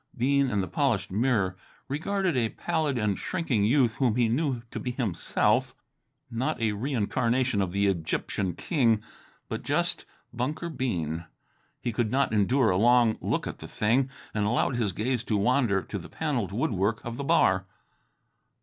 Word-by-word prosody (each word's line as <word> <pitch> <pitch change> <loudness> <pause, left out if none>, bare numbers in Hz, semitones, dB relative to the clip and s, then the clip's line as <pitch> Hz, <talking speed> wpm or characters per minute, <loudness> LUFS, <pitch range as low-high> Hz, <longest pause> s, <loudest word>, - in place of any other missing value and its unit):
Bean, 140 +2 +2
in 105 -4 +1
the 95 - -3
polished 105 - 0
mirror, 105 -3 +1 0.3
regarded 180 +4 -1
a 115 -3 +1
pallid 155 -4 -1
and 105 -4 0
shrinking 155 - 0
youth 120 -1 +3
whom 125 -5 +2
he 120 -2 +3
knew 125 0 0
to - - -4
be 125 - -3
himself 120 -8 0 0.6
not 130 +5 -1
a 110 -2 +1
reincarnation 120 0 0
of 95 -2 -1
the 100 +2 +1
Egyptian 95 0 -1
king, 115 - +1 0.4
but - - -4
just - - -1 0.3
Bunker 150 +8 -2
Bean. 85 - -2 0.5
He 120 - -2
could 110 -1 0
not 135 -1 +1
endure 110 +4 +3
a 90 - +2
long 120 +1 +4
look - - -1
at - - -6
the - - -8
thing, 125 +5 +1 0.2
and 105 -1 0
allowed 120 +3 +1
his 115 -5 0
gaze 120 +5 -1
to 105 - +1
wander 105 -2 +2
to 100 - -5
the 85 - -10
panelled 130 - -2
woodwork 110 - 0
of 120 0 -5
the 140 - -3
bar. 95 - +3
120 Hz, 165 wpm, -27 LUFS, 100-135 Hz, 0.6 s, long